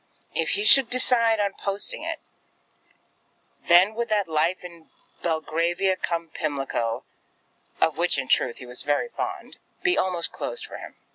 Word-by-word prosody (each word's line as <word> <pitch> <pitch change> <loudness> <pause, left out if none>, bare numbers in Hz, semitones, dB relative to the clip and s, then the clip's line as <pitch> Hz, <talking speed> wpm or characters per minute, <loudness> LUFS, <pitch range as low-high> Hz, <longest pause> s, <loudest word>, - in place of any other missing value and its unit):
If - - 0
he 410 - -1
should 270 - +7
decide 235 -3 +3
on 200 -1 0
posting 205 - -3
it, - - -4 1.5
then 180 +5 +6
would 235 +1 -3
that 205 -3 +1
life 165 +4 0
in 170 -2 -12 0.3
Belgravia 170 +3 0
cum 170 -2 -3
Pimlico, 135 -7 -3 0.8
of 160 - +2
which 175 -3 +2
in 130 -2 -2
truth 120 - +2
he 125 - -10
was 125 0 -4
very 145 +11 0
fond, - - -6 0.3
be 370 -1 +3
almost 180 -2 0
closed - - -5
for - - -9
him. - - -10
180 Hz, 150 wpm, -25 LUFS, 160-220 Hz, 1.5 s, should